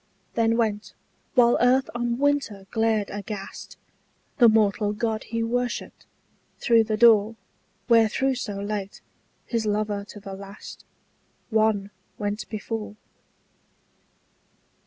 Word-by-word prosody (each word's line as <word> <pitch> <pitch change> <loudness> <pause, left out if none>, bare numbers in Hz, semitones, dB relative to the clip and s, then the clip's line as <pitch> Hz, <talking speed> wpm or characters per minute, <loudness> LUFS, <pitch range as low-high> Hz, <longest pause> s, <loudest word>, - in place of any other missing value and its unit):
Then 230 0 +2
went, 215 -3 -1 0.4
while 240 -1 +5
earth 255 +2 +4
on 240 0 -1
winter 275 -8 0
glared 220 -2 +1
aghast, 205 -1 -7 0.6
The 235 -2 +8
mortal 210 -1 +2
god 220 0 -2
he 230 0 -2
worshipped, 245 +1 -3 0.5
through 230 -2 +4
the 215 -1 -1
door 225 -1 +5 0.5
Wherethrough 235 +3 +3
so 240 -5 -4
late, 200 -1 -4 0.5
his 230 -2 -2
lover 210 -1 -1
to 205 - -11
the 195 -1 -8
last, 195 +1 -10 0.7
One 215 -2 +2 0.3
went 205 -1 -3
before. 215 -1 -5
220 Hz, 110 wpm, -25 LUFS, 205-235 Hz, 0.7 s, The